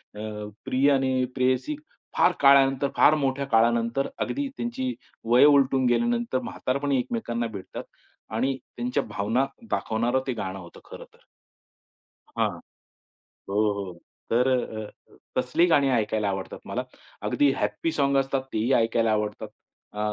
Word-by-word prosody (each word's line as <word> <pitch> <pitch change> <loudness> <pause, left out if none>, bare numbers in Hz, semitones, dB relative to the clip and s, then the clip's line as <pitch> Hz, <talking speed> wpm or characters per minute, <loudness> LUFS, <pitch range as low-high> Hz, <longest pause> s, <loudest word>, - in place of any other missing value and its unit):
अ, 105 0 -6 0.2
प्रिय 135 +2 +3
आणि 130 -2 +2
प्रेयसी 130 - +1 0.4
फार - - +5
काळानंतर, 140 0 +5
फार 155 - +6
मोठ्या 140 -1 -1
काळानंतर 115 +2 +2
अगदी 285 0 -2
त्यांची 255 +2 -2 0.4
वयं 125 +4 +7
उलटून 135 -2 +4
गेल्यानंतर 235 - +1
म्हातारपणी 140 - -1
एकमेकांना 120 - -2
भेटतात 100 -4 -8 0.5
आणि 130 +3 0 0.2
त्यांच्या 125 +1 -1
भावना 110 +5 0 0.3
दाखवणारं 120 +4 0
ते 130 - 0
गाणं 95 -3 -5
होतं 85 -1 -12
खरं - - -10
तर. - - -23 1.2
हां. - - +2 1.0
हो, 100 - -3 0.2
हो 100 -3 -5 0.4
तर 125 +3 +3
अ, 110 -4 -1 0.5
तसली 165 +7 +2
गाणी 140 -4 +4
ऐकायला 110 -3 0
आवडतात 95 -1 -5
मला. - - -3 0.4
अगदी 145 -1 +2
हॅप्पी 105 +10 -1
सॉन्ग 140 -1 +2
असतात 135 0 -1
तेही 110 +5 0
ऐकायला 115 -1 +2
आवडतात. 105 -1 -2 0.5
अ, 105 - -7
130 Hz, 130 wpm, -26 LUFS, 110-140 Hz, 1.2 s, वयं